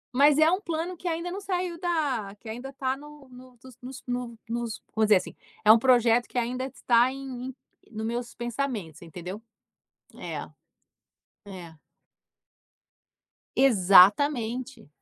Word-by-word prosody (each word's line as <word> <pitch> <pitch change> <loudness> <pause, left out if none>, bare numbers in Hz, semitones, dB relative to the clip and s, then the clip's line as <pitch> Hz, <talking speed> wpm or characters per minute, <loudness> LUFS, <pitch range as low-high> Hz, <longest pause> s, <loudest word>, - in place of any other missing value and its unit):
Mas 285 +2 +5
é 315 +1 +5
um 370 - 0
plano 340 0 -3
que 350 - -7
ainda 340 +1 -2
não 395 +2 -5
saiu 360 -3 -3
da 285 - -1
que 230 - -14
ainda 245 +4 -7
tá 260 0 -2
no 295 -1 -14
no 250 0 -15 0.2
nos 260 +1 -9
no 245 -2 -4
nos 235 -2 -4
vamos 220 -1 +3
dizer 210 - +6
assim: - - -6 0.3
é 215 - +9
um 225 - +7
projeto 240 -1 +4
que - - -7
ainda 250 +2 -1
está 245 -1 +2
em 270 +1 -8 0.2
em 260 - -10 0.4
no 220 0 -5
meus 235 +1 -4
pensamentos, 240 - -4
você 170 - -12
entendeu? 180 +5 -8 0.8
É. - - -6 1.0
É. 175 -4 -10 1.8
Exatamente. 235 - +4
250 Hz, 145 wpm, -27 LUFS, 220-285 Hz, 1.8 s, é